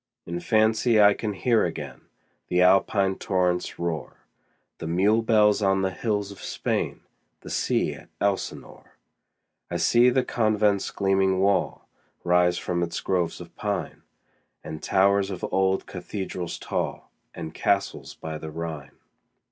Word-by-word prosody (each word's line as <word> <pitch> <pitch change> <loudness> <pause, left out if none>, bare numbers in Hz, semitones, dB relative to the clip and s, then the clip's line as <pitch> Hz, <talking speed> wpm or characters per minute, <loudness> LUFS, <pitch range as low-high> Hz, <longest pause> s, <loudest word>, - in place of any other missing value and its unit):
In 85 0 -4
fancy 110 +3 +3
I 105 -1 +7
can 105 0 -3
hear 115 +2 +2
again - - -5 0.5
The 90 0 +3
Alpine 95 +1 +3
torrent's 90 -2 0
roar, 85 -2 -4 0.6
The 80 - -5
mule 100 +7 +3
bells 105 -2 +3
on 95 -1 +2
the 95 - 0
hills 105 0 -2
of 100 - -12
Spain, - - -2
15 - - -37 0.4
The - - -10
sea - - 0
at - - -13
Elsinore. 100 -1 -3 0.7
I - - -2
see 120 +1 +5
the 130 +1 +2
convent's 105 -4 +1
gleaming 95 -1 +1
wall 100 +1 +1 0.4
Rise 90 0 +3
from 85 -1 -2
its 85 -1 -2
groves 90 -3 -1
of - - -12
pine, - - -3 0.6
And 80 - -7
towers 100 +1 +3
of 95 -3 -4
old 95 0 +2
cathedrals 95 -3 -5
tall, - - -4 0.2
And 80 - -6
castles 100 -1 -1
by 80 -1 -6
the 80 - -7
Rhine. 80 -3 -6
95 Hz, 140 wpm, -25 LUFS, 90-105 Hz, 0.7 s, I